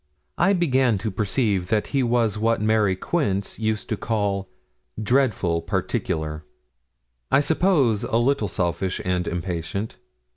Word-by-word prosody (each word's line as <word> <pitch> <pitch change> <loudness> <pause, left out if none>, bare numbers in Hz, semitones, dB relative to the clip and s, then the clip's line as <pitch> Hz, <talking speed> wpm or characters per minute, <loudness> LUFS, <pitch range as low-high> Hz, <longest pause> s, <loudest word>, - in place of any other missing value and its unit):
I 195 +4 +4
began 130 - +2
to 110 +3 -3
perceive 100 -2 0
that 105 +1 0
he 135 - +3
was 120 -3 +1
what 115 +2 +1
Mary 105 -2 +2
Quince 100 - -2
used 110 -1 -1
to 110 - 0
call 100 -4 -1 0.5
'dreadful 110 -8 +1
particular' 85 -5 -2 0.9
I - - +5
suppose 145 - +2
a 115 - 0
little 120 -2 +1
selfish 90 +1 -1
and 90 -1 0
impatient. 90 +4 -3
105 Hz, 125 wpm, -23 LUFS, 95-120 Hz, 0.9 s, I